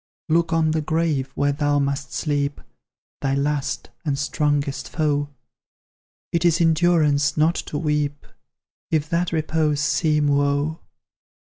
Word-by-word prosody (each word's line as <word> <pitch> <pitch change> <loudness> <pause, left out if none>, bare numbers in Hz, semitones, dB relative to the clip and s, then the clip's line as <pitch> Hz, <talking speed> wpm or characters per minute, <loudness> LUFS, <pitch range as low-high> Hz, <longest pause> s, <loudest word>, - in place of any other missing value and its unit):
"Look 165 +1 +2
on 160 -1 +2
the 155 0 0
grave 155 -4 0
where 145 0 +2
thou 145 0 +1
must 140 -1 -1
sleep 145 +3 -1 0.6
Thy 135 -1 0
last, 140 0 -2
and 145 -4 -1
strongest 145 -1 -1
foe; 145 -2 0 1.0
It 170 0 0
is 170 -1 +3
endurance 160 -3 +3
not 155 +2 +4 0.2
to 145 - -3
weep, 150 -2 -1 0.6
If 155 -2 0
that 170 +1 0
repose 155 -2 0
seem 150 0 +2
woe. 145 +2 +1
150 Hz, 125 wpm, -22 LUFS, 145-160 Hz, 1.0 s, not